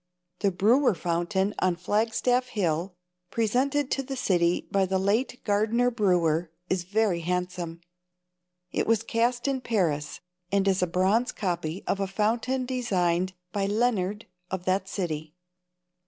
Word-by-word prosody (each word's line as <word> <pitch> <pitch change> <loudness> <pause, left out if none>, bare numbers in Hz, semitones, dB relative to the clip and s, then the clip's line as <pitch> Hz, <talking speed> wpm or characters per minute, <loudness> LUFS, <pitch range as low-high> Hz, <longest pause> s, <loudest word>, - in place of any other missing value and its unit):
The 200 - +2
Brewer 220 +6 +3
fountain 180 +4 0
on 185 -2 +2
Flagstaff 225 +7 +1
hill, 180 -5 -1 0.3
presented 260 +5 +1
to 275 - +1
the 270 0 -5
city 175 -8 +1
by 195 -1 +2
the 190 +1 +1
late 215 +7 0
Gardner 220 +4 +2
Brewer, 175 -7 +2 0.2
is 185 -2 0
very 200 -2 +1
handsome. 180 -1 -3 0.9
It - - -1
was 225 0 +3
cast 240 +3 0
in 270 -2 0
Paris, 170 -12 -1 0.3
and 200 0 +2
is 190 -1 +2
a 180 - +2
bronze 190 +8 +2
copy 175 -3 -3
of 195 - 0
a 195 - 0
fountain 230 +6 0
designed 185 -8 0 0.2
by 195 0 0
Lienard 210 -2 0 0.2
of 185 -1 -4
that 190 +1 +1
city. 160 -5 -4
195 Hz, 140 wpm, -27 LUFS, 180-230 Hz, 0.9 s, Brewer